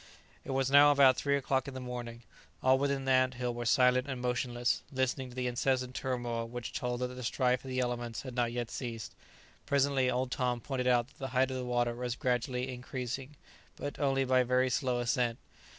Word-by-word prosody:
It -, -, -11 dB
was 135 Hz, 0 st, 0 dB
now 145 Hz, +1 st, +8 dB
about 140 Hz, -2 st, +6 dB
three 140 Hz, -1 st, +1 dB
o'clock 135 Hz, -1 st, 0 dB
in 135 Hz, -, -7 dB
the -, -, -4 dB
morning. 120 Hz, -2 st, -6 dB, 0.4 s
All 130 Hz, 0 st, +5 dB
within 140 Hz, -1 st, 0 dB
the 135 Hz, -, +1 dB
ant 130 Hz, 0 st, +3 dB
hill 125 Hz, -1 st, -2 dB
were 120 Hz, -1 st, -4 dB
silent 125 Hz, +1 st, +4 dB
and 130 Hz, -2 st, -3 dB
motionless, 125 Hz, 0 st, 0 dB
listening 130 Hz, 0 st, -1 dB
to 125 Hz, -, -13 dB
the 130 Hz, -1 st, -2 dB
incessant 125 Hz, +1 st, 0 dB
turmoil 120 Hz, -3 st, -2 dB
which 120 Hz, 0 st, -6 dB
told 125 Hz, 0 st, -2 dB
that 125 Hz, -, -1 dB
the 125 Hz, 0 st, -8 dB
strife 125 Hz, +1 st, +1 dB
of 135 Hz, -, -8 dB
the 130 Hz, 0 st, -1 dB
elements 120 Hz, -2 st, -3 dB
had 130 Hz, -2 st, -7 dB
not 120 Hz, -1 st, 0 dB
yet 120 Hz, -1 st, -3 dB
ceased. 115 Hz, -4 st, -5 dB, 0.5 s
Presently, 140 Hz, -2 st, +2 dB
old 125 Hz, +1 st, -1 dB
Tom 125 Hz, -2 st, 0 dB
pointed 125 Hz, 0 st, -3 dB
out 120 Hz, 0 st, +3 dB
that -, -, -25 dB
the 135 Hz, -, -3 dB
height 130 Hz, 0 st, +3 dB
of 130 Hz, -, -3 dB
the 125 Hz, -, -4 dB
water 120 Hz, -1 st, +1 dB
was 120 Hz, 0 st, -3 dB
gradually 125 Hz, +1 st, -1 dB
increasing, 130 Hz, +2 st, -5 dB, 0.4 s
but 145 Hz, -, -6 dB
only 135 Hz, -2 st, +2 dB
by 130 Hz, 0 st, +4 dB
very 125 Hz, +1 st, +2 dB
slow 125 Hz, -2 st, 0 dB
ascent. 120 Hz, -1 st, 0 dB
125 Hz, 210 wpm, -31 LUFS, 120-130 Hz, 0.5 s, now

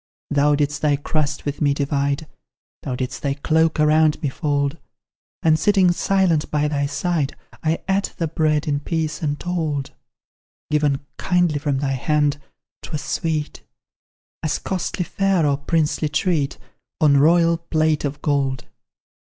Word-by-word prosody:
Thou 145 Hz, 0 st, +3 dB
didst 145 Hz, 0 st, -1 dB
thy 150 Hz, -2 st, +3 dB
crust 150 Hz, +1 st, -2 dB
with 145 Hz, 0 st, -3 dB
me 145 Hz, -2 st, +3 dB
divide, 140 Hz, +1 st, -1 dB, 0.6 s
Thou 130 Hz, -, -3 dB
didst 125 Hz, -1 st, -4 dB
thy 140 Hz, -1 st, -1 dB
cloak 160 Hz, +2 st, +1 dB
around 155 Hz, 0 st, +4 dB
me 145 Hz, -, +1 dB
fold; 145 Hz, +1 st, -1 dB, 0.6 s
And, 155 Hz, -1 st, +4 dB
sitting 195 Hz, -1 st, +4 dB
silent 175 Hz, -3 st, +1 dB
by 150 Hz, 0 st, +1 dB
thy 145 Hz, -1 st, 0 dB
side, 150 Hz, -1 st, -1 dB, 0.3 s
I 160 Hz, +1 st, 0 dB
ate 195 Hz, +1 st, 0 dB
the 165 Hz, -, -1 dB
bread 155 Hz, 0 st, 0 dB
in 145 Hz, -1 st, +1 dB
peace 155 Hz, 0 st, -2 dB
untold: 150 Hz, -2 st, -2 dB, 0.8 s
Given 145 Hz, -2 st, +1 dB
kindly 175 Hz, -5 st, +1 dB
from 145 Hz, -2 st, -1 dB
thy 135 Hz, 0 st, -1 dB
hand, 145 Hz, +2 st, +1 dB, 0.4 s
'twas 150 Hz, -, -5 dB
sweet 155 Hz, -2 st, -2 dB, 0.8 s
As 155 Hz, -, 0 dB
costly 180 Hz, -1 st, -3 dB
fare 195 Hz, -4 st, +1 dB
or 140 Hz, -1 st, +2 dB
princely 155 Hz, 0 st, 0 dB
treat 155 Hz, -3 st, 0 dB, 0.4 s
On 145 Hz, -4 st, +5 dB
royal 165 Hz, +3 st, +4 dB
plate 155 Hz, -2 st, 0 dB
of 145 Hz, 0 st, -4 dB
gold. 135 Hz, -4 st, 0 dB
150 Hz, 140 wpm, -21 LUFS, 145-165 Hz, 0.8 s, On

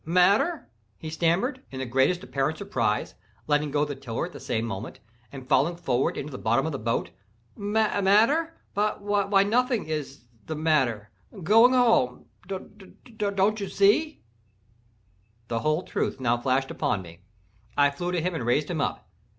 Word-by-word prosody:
"Matter!" 195 Hz, -, +2 dB, 0.3 s
he 155 Hz, -, -7 dB
stammered, 180 Hz, -, 0 dB
in 135 Hz, -, -8 dB
the 130 Hz, -, -3 dB
greatest 135 Hz, +9 st, +1 dB
apparent 140 Hz, +3 st, -1 dB
surprise, -, -, -1 dB, 0.3 s
letting 150 Hz, 0 st, +1 dB
go 145 Hz, +1 st, +1 dB
the 145 Hz, -, -4 dB
tiller 125 Hz, -1 st, -4 dB
at 175 Hz, -, -10 dB
the -, -, -9 dB
same 110 Hz, 0 st, -2 dB
moment, 105 Hz, -2 st, -6 dB, 0.3 s
and 130 Hz, -2 st, -10 dB
falling 145 Hz, +7 st, +2 dB
forward 135 Hz, -7 st, 0 dB
into 150 Hz, +2 st, -5 dB
the 130 Hz, -, -7 dB
bottom 120 Hz, +6 st, +1 dB
of 160 Hz, -, -2 dB
the 140 Hz, -, -4 dB
boat—"matter—why, 200 Hz, -, 0 dB
nothing 240 Hz, +2 st, +1 dB
is 150 Hz, -5 st, -5 dB, 0.2 s
the—matter—going 155 Hz, -, +2 dB
home—d—d—don't 200 Hz, -, -1 dB
you 200 Hz, -, -4 dB
see?" 225 Hz, +11 st, +2 dB, 1.3 s
The 115 Hz, -, -1 dB
whole 155 Hz, +6 st, 0 dB
truth -, -, -2 dB
now 120 Hz, -2 st, +2 dB
flashed 130 Hz, +2 st, 0 dB
upon 95 Hz, -, -1 dB
me. 85 Hz, -1 st, -13 dB, 0.6 s
I 145 Hz, 0 st, +5 dB
flew 175 Hz, +5 st, -4 dB
to 175 Hz, -2 st, 0 dB
him 180 Hz, +1 st, -1 dB
and 160 Hz, -, -3 dB
raised 145 Hz, +7 st, +1 dB
him 160 Hz, -4 st, -1 dB
up. -, -, -3 dB
160 Hz, 140 wpm, -26 LUFS, 130-200 Hz, 1.3 s, I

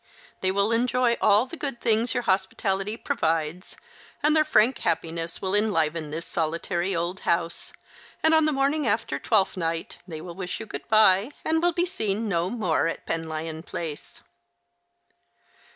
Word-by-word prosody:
They 185 Hz, -, +1 dB
will 200 Hz, +3 st, +2 dB
enjoy 245 Hz, +1 st, +2 dB
all 210 Hz, +2 st, +5 dB
the 265 Hz, -, -9 dB
good 275 Hz, -6 st, -5 dB
things 230 Hz, +2 st, +1 dB
your 245 Hz, -, 0 dB
hospitality 195 Hz, +1 st, 0 dB
provides, 160 Hz, 0 st, -2 dB, 0.5 s
and 300 Hz, +1 st, +4 dB
their 310 Hz, -, +5 dB
frank 255 Hz, -4 st, +3 dB
happiness 165 Hz, +1 st, -2 dB
will 190 Hz, 0 st, 0 dB
enliven 165 Hz, -7 st, +1 dB
this 160 Hz, +3 st, -5 dB
solitary 170 Hz, +3 st, -1 dB
old 170 Hz, +3 st, -2 dB
house, 170 Hz, 0 st, -1 dB, 0.5 s
and 320 Hz, 0 st, +5 dB
on 315 Hz, -1 st, +5 dB
the 310 Hz, -, +2 dB
morning 280 Hz, 0 st, +1 dB
after 140 Hz, -9 st, 0 dB
Twelfth 195 Hz, 0 st, +2 dB
Night 165 Hz, -1 st, -3 dB
they 160 Hz, -3 st, -6 dB
will 170 Hz, +2 st, -8 dB
wish 180 Hz, 0 st, -5 dB
you 225 Hz, -, -6 dB
good -, -, -8 dB
bye, 215 Hz, 0 st, +5 dB, 0.2 s
and 320 Hz, 0 st, +1 dB
will 350 Hz, +1 st, +3 dB
be 345 Hz, +1 st, 0 dB
seen 220 Hz, -, -2 dB
no 175 Hz, -2 st, 0 dB
more 185 Hz, -8 st, 0 dB
at 165 Hz, -, -5 dB
Penlyon 160 Hz, -1 st, -4 dB
Place." 160 Hz, -3 st, -6 dB
195 Hz, 160 wpm, -25 LUFS, 165-235 Hz, 0.5 s, all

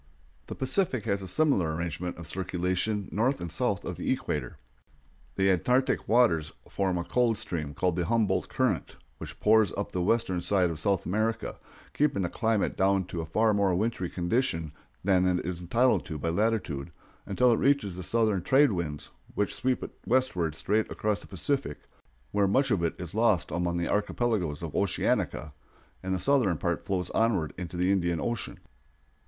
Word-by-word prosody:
The -, -, -6 dB
Pacific 130 Hz, -, 0 dB
has 100 Hz, -3 st, 0 dB
a 95 Hz, -, -6 dB
similar 95 Hz, -, +2 dB
arrangement 85 Hz, +1 st, -4 dB
of 85 Hz, -, -8 dB
circulation 95 Hz, +3 st, -1 dB
north 125 Hz, +6 st, +1 dB
and 85 Hz, -2 st, -5 dB
south 105 Hz, -1 st, -1 dB
of 90 Hz, -, -4 dB
the -, -, -1 dB
equator. 75 Hz, -, -2 dB, 0.8 s
The 95 Hz, 0 st, +3 dB
Antarctic 125 Hz, -, +1 dB
waters 95 Hz, -10 st, +3 dB, 0.2 s
form 95 Hz, -2 st, -1 dB
a 85 Hz, -, -1 dB
cold 120 Hz, +3 st, +1 dB
stream 80 Hz, -7 st, -3 dB
named 90 Hz, -2 st, +1 dB
the 85 Hz, -1 st, -1 dB
Humboldt 105 Hz, -5 st, +1 dB
current, -, -, -1 dB, 0.2 s
which -, -, -8 dB
pours 110 Hz, -3 st, +4 dB
up 100 Hz, -, -4 dB
the 90 Hz, -, -2 dB
western 95 Hz, -2 st, +1 dB
side 90 Hz, -1 st, +2 dB
of 80 Hz, -, -5 dB
South 95 Hz, +2 st, 0 dB
America, 110 Hz, +5 st, -1 dB, 0.3 s
keeping 140 Hz, -9 st, +1 dB
the 90 Hz, -, -1 dB
climate 110 Hz, +1 st, 0 dB
down 95 Hz, 0 st, +2 dB
to 85 Hz, -, -3 dB
a 80 Hz, -, -6 dB
far 110 Hz, +3 st, +2 dB
more 100 Hz, -3 st, +2 dB
wintry 100 Hz, -2 st, -1 dB
condition 85 Hz, -, -1 dB, 0.3 s
than 95 Hz, -1 st, +3 dB
it 90 Hz, -2 st, 0 dB
is 90 Hz, 0 st, -4 dB
entitled 120 Hz, +9 st, +2 dB
to 80 Hz, -, -4 dB
by 80 Hz, +3 st, -2 dB
latitude, 85 Hz, -7 st, -1 dB, 0.4 s
until 125 Hz, -1 st, +3 dB
it 115 Hz, -, +3 dB
reaches 135 Hz, -10 st, +2 dB
the 90 Hz, -, -6 dB
southern 110 Hz, -1 st, +1 dB
trade 135 Hz, +6 st, +4 dB
winds, 80 Hz, -6 st, -4 dB, 0.2 s
which 105 Hz, -, 0 dB
sweep 125 Hz, +5 st, -1 dB
it -, -, -6 dB, 0.2 s
westward 95 Hz, -, +1 dB
straight 105 Hz, +5 st, 0 dB
across 105 Hz, -1 st, -1 dB
the -, -, -12 dB
Pacific, 135 Hz, -, -2 dB, 0.5 s
where 100 Hz, -1 st, +2 dB
much 135 Hz, +6 st, +2 dB
of 100 Hz, -5 st, +2 dB
it 85 Hz, -, -1 dB
is 85 Hz, -2 st, -7 dB
lost 110 Hz, -5 st, +2 dB
among 85 Hz, +1 st, -1 dB
the 85 Hz, -, -1 dB
archipelagoes 105 Hz, -7 st, -1 dB
of 80 Hz, -, -5 dB
Oceanica, 85 Hz, -5 st, 0 dB, 0.5 s
and 95 Hz, 0 st, -1 dB
the -, -, 0 dB
southern 105 Hz, -, +2 dB
part 85 Hz, +3 st, -2 dB
flows 90 Hz, -3 st, -1 dB
onward 105 Hz, -9 st, +1 dB
into 90 Hz, 0 st, -6 dB
the 90 Hz, +2 st, +2 dB
Indian 85 Hz, -4 st, +1 dB
Ocean. 120 Hz, +4 st, -3 dB
95 Hz, 180 wpm, -28 LUFS, 85-115 Hz, 0.8 s, pours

